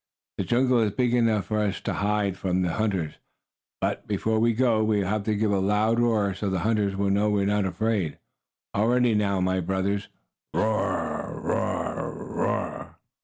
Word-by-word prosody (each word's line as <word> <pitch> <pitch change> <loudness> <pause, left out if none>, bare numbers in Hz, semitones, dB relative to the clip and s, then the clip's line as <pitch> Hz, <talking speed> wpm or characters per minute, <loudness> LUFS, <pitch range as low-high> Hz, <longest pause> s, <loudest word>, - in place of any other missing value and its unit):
The - - 0
jungle 125 0 +3
is 105 -3 +1
big 120 +2 +1
enough 115 -4 +2
for 110 -1 -1
us 100 -2 0
to - - -2
hide 100 -1 0
from 95 -1 0
the 90 - 0
hunters. 95 -6 -1 0.6
But, - - -2
before 110 +2 0
we 115 +1 +3
go, 115 -3 +3
we 110 -1 +2
will 105 +3 0
give 105 0 0
a 100 - +2
loud 105 +4 +2
roar 110 -4 +2
so 100 +1 -3
the 95 -2 -1
hunters 105 -3 +1
will 100 0 +1
know 105 +2 +2
we 100 -1 +1
are - - 0
not 105 0 +1
afraid. 100 -4 -1 0.6
All 105 +2 +2
ready 125 -1 +3
now, 100 -2 +1
my 95 0 +1
brothers. 95 +3 -1 0.5
Roar! 110 0 -1
Roar! - - -2
Roar!" - - -3
105 Hz, 175 wpm, -26 LUFS, 100-110 Hz, 0.6 s, jungle